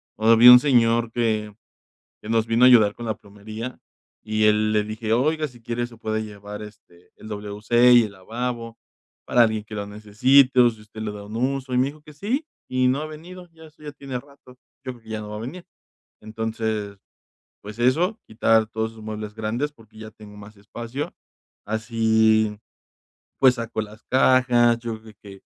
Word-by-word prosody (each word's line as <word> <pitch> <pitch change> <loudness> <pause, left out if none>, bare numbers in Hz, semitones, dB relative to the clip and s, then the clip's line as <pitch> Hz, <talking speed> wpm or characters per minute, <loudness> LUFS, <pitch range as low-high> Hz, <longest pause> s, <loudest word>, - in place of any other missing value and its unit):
O 110 +1 -2
había 115 +2 +9
un 125 - +10
señor 115 -4 +2
que 110 -3 -1 0.7
que 105 - -10
nos 115 -1 +2
vino 115 +2 +2
a - - +9
ayudar 110 -4 +6
con 120 - -8
la 110 -1 -2
plomería 110 +4 -9 0.5
y 110 0 0
él 105 0 +3
le 105 -1 +1
dije: 110 +1 -5
"Oiga, 155 +6 +1
si 120 -2 -18
quiere 120 +1 -3
se 115 - -16
puede 110 -1 -3
llevar, 105 0 -9
este, 90 -4 -15
el 110 - -12
WC 105 +4 +2
y 120 -1 +7
el 105 -2 -6
lavabo 115 +3 -5 0.5
para 120 - +3
alguien 110 -1 -1
que 105 - -9
lo 100 -1 -4
necesite, 125 +6 +3
o 120 - +6
si 110 -2 -11
usted 110 +1 -11
le 105 -1 -3
da 105 -1 -9
un 105 +2 -9
uso", 130 +1 -2
y - - +2
me 130 +2 +3
dijo 150 +1 -10
que 150 0 -15
sí, 240 - -2 0.2
y 130 0 +1
no 135 +4 +1
ha 155 - -5
venido, 175 +3 -11
ya 160 -1 -16
eso 155 0 -19
ya 145 - -7
tiene 135 -3 -7
rato, 140 -2 -19 0.3
yo 130 - -4
creo 120 - -18
que 110 - -17
ya 110 -1 -4
no 105 0 -8
va - - -6
a - - -6
venir. 165 +10 -8 0.6
Entonces, 110 -2 -4 0.6
pues 105 +2 -10
eso, 165 - +1
quitar 110 0 +2
todos 110 0 -3
esos 110 -1 -14
muebles 105 -1 -6
grandes 115 +7 -2
porque 110 -5 -19
ya 110 0 -9
tengo 105 -1 -14
más 105 +1 -13
espacio, 115 +7 -7 0.5
así, 110 -1 +2 0.8
pues, 130 -2 +5
saco 115 -1 -4
las 105 +1 -13
cajas, 125 -2 +3
yo 115 -2 -6
creo 110 -1 -14
que 100 -1 -13
115 Hz, 195 wpm, -23 LUFS, 110-125 Hz, 0.8 s, un